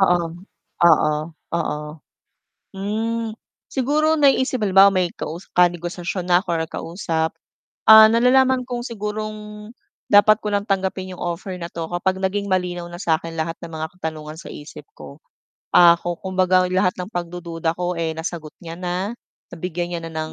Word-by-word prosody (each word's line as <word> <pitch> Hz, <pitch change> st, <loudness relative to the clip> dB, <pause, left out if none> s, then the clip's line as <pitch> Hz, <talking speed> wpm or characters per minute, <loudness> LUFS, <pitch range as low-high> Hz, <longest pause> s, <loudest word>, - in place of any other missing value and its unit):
Oo, 175 Hz, -3 st, +2 dB, 0.6 s
oo, 150 Hz, -1 st, +4 dB, 0.4 s
oo. 155 Hz, -3 st, -1 dB, 0.9 s
Hmm, 220 Hz, +3 st, -2 dB, 0.4 s
siguro 300 Hz, +4 st, +1 dB
naiisip 270 Hz, -2 st, +3 dB
halimbawa 195 Hz, -1 st, +6 dB
may 185 Hz, -2 st, +1 dB
kausa 170 Hz, +4 st, -6 dB
ka-negosasyon 175 Hz, +1 st, 0 dB
na 180 Hz, +2 st, +4 dB
ako -, -, -13 dB
or 165 Hz, -1 st, 0 dB
kausap, 165 Hz, -1 st, -2 dB, 0.5 s
ah, 220 Hz, 0 st, +10 dB
nalalaman 255 Hz, +3 st, +4 dB
kong 245 Hz, 0 st, -5 dB
sigurong 210 Hz, -1 st, -6 dB, 0.4 s
dapat 215 Hz, +1 st, +6 dB
ko 210 Hz, -, -4 dB
lang 205 Hz, -1 st, 0 dB
tanggapin 190 Hz, -1 st, -2 dB
'yong 180 Hz, -, -10 dB
offer 175 Hz, +2 st, -4 dB
na 170 Hz, -, -5 dB
'to 165 Hz, -1 st, -6 dB
kapag 190 Hz, +2 st, -1 dB
naging 200 Hz, +1 st, -1 dB
malinaw 180 Hz, -2 st, -1 dB
na 175 Hz, 0 st, -9 dB
sa 160 Hz, -1 st, +2 dB
akin 165 Hz, -2 st, -8 dB
lahat 165 Hz, +1 st, -3 dB
ng 170 Hz, -1 st, -8 dB
mga 160 Hz, 0 st, -3 dB
katanungan 155 Hz, -2 st, -6 dB
sa -, -, -10 dB
isip 145 Hz, -, -10 dB
ko. -, -, -12 dB, 0.6 s
Ah, 170 Hz, -1 st, +7 dB
ku 175 Hz, 0 st, -3 dB
kumbaga 185 Hz, -1 st, +2 dB
lahat 185 Hz, 0 st, +2 dB
ng 180 Hz, +3 st, -6 dB
pagdududa 170 Hz, -2 st, -3 dB
ko 175 Hz, 0 st, -3 dB
eh, 160 Hz, -1 st, -1 dB
nasagot 160 Hz, -1 st, -6 dB
niya 165 Hz, 0 st, -8 dB
na, 180 Hz, +3 st, -2 dB, 0.4 s
nabigyan 175 Hz, 0 st, -4 dB
niya 170 Hz, -1 st, -3 dB
na 165 Hz, -, -7 dB
ng 155 Hz, 0 st, -4 dB
180 Hz, 160 wpm, -21 LUFS, 170-210 Hz, 0.9 s, ah